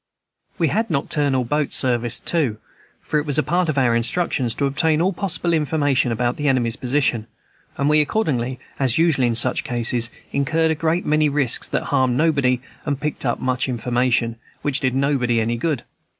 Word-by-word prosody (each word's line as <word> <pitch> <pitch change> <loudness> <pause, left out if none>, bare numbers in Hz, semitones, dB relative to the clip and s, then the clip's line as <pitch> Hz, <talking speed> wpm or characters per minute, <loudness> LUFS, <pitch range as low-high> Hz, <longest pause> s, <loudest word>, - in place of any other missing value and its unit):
We 165 -3 +1
had 220 +5 0
nocturnal 140 -3 0
boat 150 +3 -1
service, 120 -2 +1
too, 140 -11 0 0.4
for 150 - -1
it 150 - -4
was 145 - +1
a - - +3
part 170 +4 0
of 150 - -1
our 125 -3 +3
instructions 120 -1 0
to 140 - 0
obtain 155 +3 +1
all 185 +4 +1
possible 175 -2 -2
information 145 -5 +1
about 120 +2 -1
the 145 - -1
enemy's 120 -4 +2
position; 125 -4 0 0.5
and 140 - 0
we 150 0 +4
accordingly, 135 - -1 0.2
as 130 -4 +3
usual 160 -6 +3
in 115 - 0
such 115 - +2
cases, 120 -1 0 0.2
incurred 160 +4 +1
a - - +3
great 165 +3 -1
many 155 0 +2
risks 140 -4 0
that - - -1
harmed 130 -3 +1
nobody, 140 -6 +2 0.2
and 145 -2 -2
picked 150 -3 -3
up 120 - -1
much 130 0 -1
information 120 -1 0 0.3
which 145 -2 0
did 130 -2 0
nobody 135 -4 +1
any 115 +1 0
good. 130 0 -2
135 Hz, 180 wpm, -21 LUFS, 120-155 Hz, 0.5 s, we